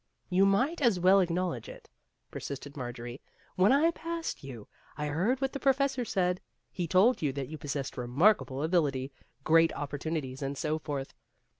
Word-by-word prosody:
" -, -, -44 dB
You 195 Hz, -, +6 dB
might 260 Hz, +12 st, +1 dB
as 230 Hz, -9 st, +3 dB
well 185 Hz, +3 st, +6 dB
acknowledge 175 Hz, -, -1 dB
it," -, -, -12 dB, 0.4 s
persisted 140 Hz, +1 st, -7 dB
Marjorie; 120 Hz, -1 st, -6 dB, 0.2 s
" -, -, -32 dB
when 185 Hz, +4 st, +4 dB
I 305 Hz, +5 st, +4 dB
passed 330 Hz, -, -5 dB
you, 120 Hz, -6 st, -9 dB, 0.3 s
I 150 Hz, -, -2 dB
heard 180 Hz, -, 0 dB
what 270 Hz, -1 st, -1 dB
the 275 Hz, -, -4 dB
professor 270 Hz, -1 st, +2 dB
said. 180 Hz, -3 st, 0 dB, 0.3 s
He 175 Hz, -2 st, -3 dB
told 195 Hz, +9 st, +4 dB
you 145 Hz, -3 st, +1 dB
that 140 Hz, -1 st, -4 dB
you 155 Hz, -1 st, -7 dB
possessed 140 Hz, -2 st, -4 dB
remarkable 135 Hz, -, +2 dB
ability, 145 Hz, -6 st, +1 dB, 0.3 s
great 165 Hz, +2 st, +5 dB
opportunities, 145 Hz, -2 st, -4 dB
and 140 Hz, 0 st, -3 dB
so 155 Hz, +2 st, -1 dB
forth. 140 Hz, -3 st, -5 dB
165 Hz, 170 wpm, -30 LUFS, 140-200 Hz, 0.4 s, You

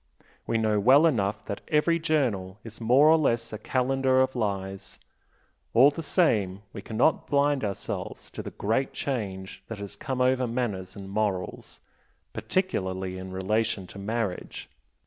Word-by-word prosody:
We 115 Hz, -, +1 dB
know 110 Hz, -2 st, +2 dB
well 135 Hz, +9 st, +6 dB
enough 105 Hz, -9 st, 0 dB
that 100 Hz, -, -5 dB
every 165 Hz, +2 st, +2 dB
journal 120 Hz, -, 0 dB
is 115 Hz, 0 st, -11 dB
more 125 Hz, +6 st, +5 dB
or 160 Hz, +1 st, +7 dB
less 115 Hz, -7 st, 0 dB
a 110 Hz, -, -5 dB
calendar 130 Hz, +2 st, +1 dB
of 130 Hz, 0 st, -3 dB
lies, 95 Hz, -4 st, -3 dB, 0.8 s
all 135 Hz, +5 st, +7 dB
the 155 Hz, -, -6 dB
same 105 Hz, -, +1 dB
we 100 Hz, -, -6 dB
cannot 115 Hz, +9 st, +1 dB
blind 145 Hz, -2 st, +2 dB
ourselves 100 Hz, -2 st, -5 dB
to -, -, -6 dB
the -, -, -6 dB
great 115 Hz, +6 st, -1 dB
change 95 Hz, -8 st, -4 dB
that 115 Hz, -, -6 dB
has 100 Hz, -1 st, -8 dB
come 135 Hz, -4 st, -4 dB
over 130 Hz, 0 st, +2 dB
manners 105 Hz, -7 st, -3 dB
and 100 Hz, -1 st, -8 dB
morals 100 Hz, -2 st, -3 dB, 0.5 s
particularly 95 Hz, -, -2 dB
in 95 Hz, 0 st, -7 dB
relation 105 Hz, +2 st, -1 dB
to 100 Hz, -, -11 dB
marriage. 105 Hz, -2 st, -4 dB
115 Hz, 150 wpm, -27 LUFS, 100-130 Hz, 0.8 s, or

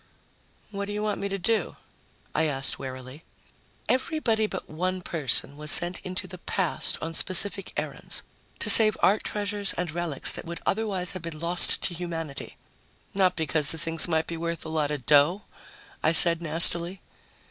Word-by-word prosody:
"What 200 Hz, -1 st, -5 dB
do 205 Hz, -, -7 dB
you 210 Hz, 0 st, -4 dB
want 210 Hz, -1 st, -3 dB
me 200 Hz, -, -3 dB
to 195 Hz, -, -4 dB
do?" 215 Hz, +4 st, -2 dB, 0.6 s
I 160 Hz, -, 0 dB
asked 135 Hz, -2 st, -1 dB
warily. 130 Hz, +3 st, -10 dB, 0.6 s
"Everybody 255 Hz, -6 st, -1 dB
but 190 Hz, -, -7 dB
one 185 Hz, +3 st, -4 dB
person 145 Hz, -4 st, 0 dB
was 150 Hz, 0 st, -7 dB
sent 175 Hz, +4 st, +1 dB
into 185 Hz, 0 st, -6 dB
the 185 Hz, -, -11 dB
past 185 Hz, -2 st, -2 dB
on 165 Hz, +1 st, -5 dB
specific 195 Hz, +3 st, 0 dB
errands -, -, -5 dB, 0.3 s
to -, -, +2 dB
save 215 Hz, -1 st, +6 dB
art 205 Hz, +3 st, +2 dB
treasures 205 Hz, -1 st, -3 dB
and 180 Hz, -2 st, -4 dB
relics 170 Hz, -4 st, 0 dB
that -, -, -7 dB
would 170 Hz, 0 st, -8 dB
otherwise 195 Hz, -4 st, -3 dB
have 185 Hz, -, -8 dB
been 165 Hz, -2 st, -8 dB
lost 170 Hz, +2 st, -1 dB
to 180 Hz, -, -2 dB
humanity." 165 Hz, -5 st, -7 dB, 0.6 s
"Not 185 Hz, -2 st, +1 dB
because 155 Hz, -2 st, -1 dB
the 165 Hz, -, +2 dB
things 165 Hz, +1 st, +3 dB
might 160 Hz, -1 st, -1 dB
be 170 Hz, -, -6 dB
worth 170 Hz, 0 st, -5 dB
a -, -, -7 dB
lot 155 Hz, -2 st, -2 dB
of 145 Hz, -5 st, -6 dB
dough?" 150 Hz, +7 st, +3 dB, 0.6 s
I 160 Hz, -, +1 dB
said 170 Hz, +2 st, +8 dB
nastily. 170 Hz, +3 st, +5 dB
170 Hz, 170 wpm, -25 LUFS, 160-195 Hz, 0.6 s, said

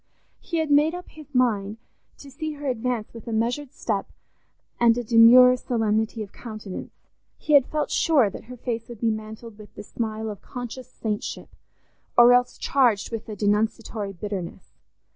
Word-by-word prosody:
He 335 Hz, -, -4 dB
had 315 Hz, -2 st, -1 dB
made 300 Hz, +4 st, +4 dB
up 360 Hz, -, -9 dB
his 300 Hz, -3 st, -15 dB
mind 215 Hz, -4 st, +1 dB, 0.4 s
to 280 Hz, -, -13 dB
see 310 Hz, +3 st, -5 dB
her 290 Hz, 0 st, -9 dB
advance 245 Hz, -3 st, -2 dB
with 230 Hz, -1 st, -11 dB
a -, -, -4 dB
measured 245 Hz, +5 st, -1 dB
step 205 Hz, -4 st, -3 dB, 0.7 s
and 235 Hz, -1 st, +4 dB
a 245 Hz, -, -2 dB
demure 240 Hz, +2 st, +7 dB
solemnity 220 Hz, -2 st, -1 dB
of 200 Hz, -, -12 dB
countenance; 215 Hz, -5 st, -8 dB, 0.4 s
he 305 Hz, -, -2 dB
had 280 Hz, -3 st, +6 dB
felt 305 Hz, -1 st, -2 dB
sure 295 Hz, -9 st, +3 dB
that -, -, -10 dB
her 250 Hz, +2 st, -10 dB
face 230 Hz, -1 st, -4 dB
would 235 Hz, -3 st, -9 dB
be 230 Hz, -1 st, +2 dB
mantled 220 Hz, 0 st, -8 dB
with 210 Hz, -, -14 dB
the -, -, -8 dB
smile 220 Hz, 0 st, -4 dB
of 205 Hz, -, -10 dB
conscious 245 Hz, 0 st, -7 dB
saintship, 210 Hz, -4 st, -4 dB, 0.7 s
or 240 Hz, 0 st, +8 dB
else 245 Hz, 0 st, +2 dB
charged 245 Hz, -8 st, +1 dB
with 225 Hz, -2 st, -5 dB
denunciatory 210 Hz, 0 st, -1 dB
bitterness. 190 Hz, -2 st, -6 dB
230 Hz, 165 wpm, -24 LUFS, 215-255 Hz, 0.7 s, or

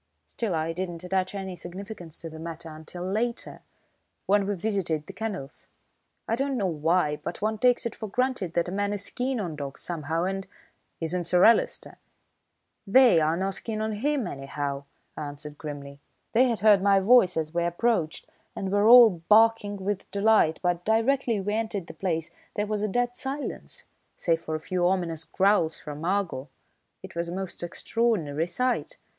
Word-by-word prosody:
Still, 215 Hz, -7 st, -3 dB
I 160 Hz, +1 st, -1 dB
didn't 175 Hz, -1 st, -5 dB
attach 185 Hz, +1 st, -1 dB
any 190 Hz, -2 st, -4 dB
significance 180 Hz, -1 st, -8 dB
to 165 Hz, -, -6 dB
the 160 Hz, -, -9 dB
matter 165 Hz, 0 st, -7 dB
until 160 Hz, +3 st, -8 dB
later, 230 Hz, +5 st, -2 dB, 0.6 s
when 200 Hz, 0 st, +3 dB
we 205 Hz, -, 0 dB
visited 180 Hz, -6 st, -1 dB
the -, -, -9 dB
kennels. 190 Hz, -11 st, -6 dB, 0.6 s
I 225 Hz, -, +1 dB
don't 270 Hz, +1 st, -1 dB
know 205 Hz, -, 0 dB
why, 160 Hz, -2 st, +1 dB
but 175 Hz, -, -6 dB
one 215 Hz, 0 st, 0 dB
takes 245 Hz, 0 st, +3 dB
it 235 Hz, -, -2 dB
for 220 Hz, -, -6 dB
granted 250 Hz, -6 st, -1 dB
that 170 Hz, 0 st, +1 dB
a -, -, -4 dB
man 205 Hz, +1 st, -1 dB
is 200 Hz, -1 st, -3 dB
keen 255 Hz, 0 st, -1 dB
on 175 Hz, -7 st, -3 dB
dogs 140 Hz, -2 st, -6 dB
somehow 165 Hz, -1 st, -2 dB
and 195 Hz, +1 st, -2 dB, 0.3 s
" -, -, -46 dB
"Isn't 175 Hz, +2 st, -1 dB
Sir 180 Hz, +1 st, +4 dB
Alister?" 230 Hz, -, +3 dB, 0.9 s
"They 235 Hz, -4 st, +6 dB
are 160 Hz, +1 st, +1 dB
not 195 Hz, +1 st, -2 dB
keen 220 Hz, -2 st, -3 dB
on 220 Hz, 0 st, -1 dB
him, 265 Hz, +4 st, 0 dB
anyhow," 140 Hz, -2 st, -4 dB, 0.3 s
I 150 Hz, -, -4 dB
answered 145 Hz, +1 st, -8 dB
grimly. 140 Hz, -2 st, -7 dB, 0.3 s
"They 250 Hz, +3 st, +5 dB
had 230 Hz, -, -1 dB
heard 210 Hz, -3 st, +6 dB
my 200 Hz, 0 st, +5 dB
voice 195 Hz, -3 st, +5 dB
as 160 Hz, 0 st, -2 dB
we 170 Hz, 0 st, +1 dB
approached 175 Hz, -1 st, 0 dB, 0.3 s
and 190 Hz, -1 st, -3 dB
were 205 Hz, +1 st, +3 dB
all 230 Hz, -8 st, +8 dB
barking 215 Hz, -1 st, +5 dB
with 205 Hz, -1 st, -2 dB
delight, 200 Hz, -5 st, +3 dB
but 175 Hz, -1 st, 0 dB
directly 230 Hz, +1 st, +2 dB
we 205 Hz, +2 st, -2 dB
entered 215 Hz, -4 st, -2 dB
the -, -, -10 dB
place 165 Hz, -4 st, -2 dB, 0.2 s
there 210 Hz, -, 0 dB
was 210 Hz, -1 st, -2 dB
a 215 Hz, -, +1 dB
dead 245 Hz, +3 st, 0 dB
silence, 275 Hz, +3 st, -4 dB, 0.3 s
save 165 Hz, -1 st, +1 dB
for 155 Hz, -, -3 dB
a -, -, -2 dB
few 175 Hz, +2 st, 0 dB
ominous 170 Hz, -4 st, -1 dB
growls 190 Hz, -5 st, +2 dB
from 150 Hz, +1 st, -8 dB
Argo. 175 Hz, -7 st, -1 dB, 0.5 s
It -, -, -9 dB
was 170 Hz, 0 st, -2 dB
a 175 Hz, -, -4 dB
most 190 Hz, -2 st, -5 dB
extraordinary 175 Hz, -4 st, 0 dB
sight. 250 Hz, +8 st, -1 dB
190 Hz, 180 wpm, -27 LUFS, 165-220 Hz, 0.9 s, all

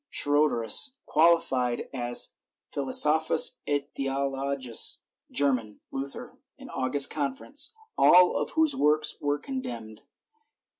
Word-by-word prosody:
Schroderus, 145 Hz, -, +2 dB
qualified 135 Hz, -7 st, +1 dB
as 120 Hz, -2 st, -1 dB, 0.4 s
"Philosophus 150 Hz, +3 st, +3 dB
et 145 Hz, -1 st, -3 dB
Theologus 135 Hz, -2 st, -2 dB, 0.3 s
German. 125 Hz, -7 st, -1 dB
Luther. 135 Hz, +1 st, -8 dB, 0.3 s
August. 135 Hz, +2 st, +2 dB
Confess.," 155 Hz, -, -2 dB, 0.2 s
all 180 Hz, 0 st, +6 dB
of -, -, -2 dB
whose 315 Hz, -3 st, +2 dB
works 150 Hz, -, +1 dB
were 145 Hz, 0 st, -1 dB
condemned. 120 Hz, -, -7 dB
140 Hz, 90 wpm, -26 LUFS, 130-155 Hz, 0.4 s, all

